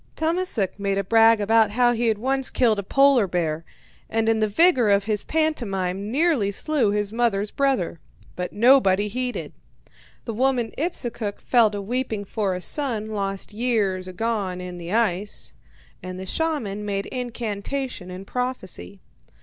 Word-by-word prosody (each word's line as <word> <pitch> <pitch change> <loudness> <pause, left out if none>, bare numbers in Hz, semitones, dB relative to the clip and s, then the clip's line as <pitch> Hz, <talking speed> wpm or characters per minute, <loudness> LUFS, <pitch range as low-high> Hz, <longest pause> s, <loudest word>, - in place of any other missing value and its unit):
Tummasook 320 - -1
made 200 -1 0
a 200 - 0
brag 225 +2 +5
about 220 +1 +4
how 240 +3 +3
he 235 0 0
had 220 -2 +2
once 265 +3 0
killed 225 -5 +2
a - - -3
polar 270 0 +4
bear, 165 -3 -1 0.5
and 225 0 0
in 225 0 +3
the 215 - +2
vigour 255 - +4
of 200 0 +4
his 210 -1 -1
pantomime 200 - -1
nearly 280 -5 +2
slew 250 +3 +1
his 205 0 -1
mother's 215 -4 0
brother. 265 -12 0 0.4
But 180 0 -4
nobody 210 -4 +4
heeded. 250 +3 -4 0.7
The 230 - -4
woman 250 0 +1
Ipsukuk 240 - -3
fell 235 -3 +4
to 205 -1 -5
weeping 225 -2 -2
for 200 -2 -1
a 180 - -4
son 230 -7 -1
lost 195 -1 -3
long 210 - -11
years 200 -7 0
agone 195 -1 -2
in 180 -1 -7
the 170 +1 -7
ice, 210 -3 0 0.5
and 185 0 -7
the 190 - -6
shaman 225 - -2
made 200 -1 -2
incantation 240 -2 -4
and 185 +1 -8
prophecy. 190 - -4
215 Hz, 160 wpm, -23 LUFS, 195-250 Hz, 0.7 s, brag